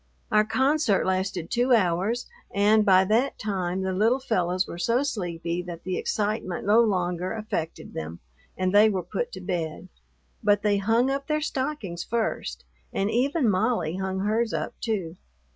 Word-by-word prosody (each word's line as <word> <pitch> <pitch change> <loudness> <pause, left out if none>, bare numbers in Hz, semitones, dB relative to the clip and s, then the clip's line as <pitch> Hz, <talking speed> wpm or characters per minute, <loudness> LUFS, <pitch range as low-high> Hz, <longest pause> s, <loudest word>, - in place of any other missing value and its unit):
Our 215 0 +4
concert 265 -2 +2
lasted 185 -2 -1
two 245 +2 +3
hours, 200 +3 +1 0.3
and 210 +2 +4
by 190 -2 +5
that 230 +7 +1
time 190 -3 -2
the 190 0 -1
little 225 +7 +2
fellows 185 -7 0
were 170 - -7
so 235 +9 +2
sleepy 175 -8 -3
that 175 -2 -8
the 185 -1 -2
excitement 205 -4 -2
no 210 +3 +5
longer 180 -4 0
affected 210 -7 -4
them 80 +1 -6 0.4
and 185 0 0
they 210 +2 +7
were 190 -3 -1
put 210 +7 -3
to 185 - -7
bed, 180 -1 -4 0.5
but 205 -1 +3
they 205 -1 +3
hung 225 +6 +2
up 275 0 -3
their 305 0 +1
stockings 260 - -3
first, 230 -1 -2 0.3
and 200 +2 0
even 270 +3 +1
Molly 185 -4 +1
hung 190 0 -2
hers 220 +3 0
up - - -3
too. 190 -7 -2
200 Hz, 160 wpm, -26 LUFS, 180-230 Hz, 0.5 s, they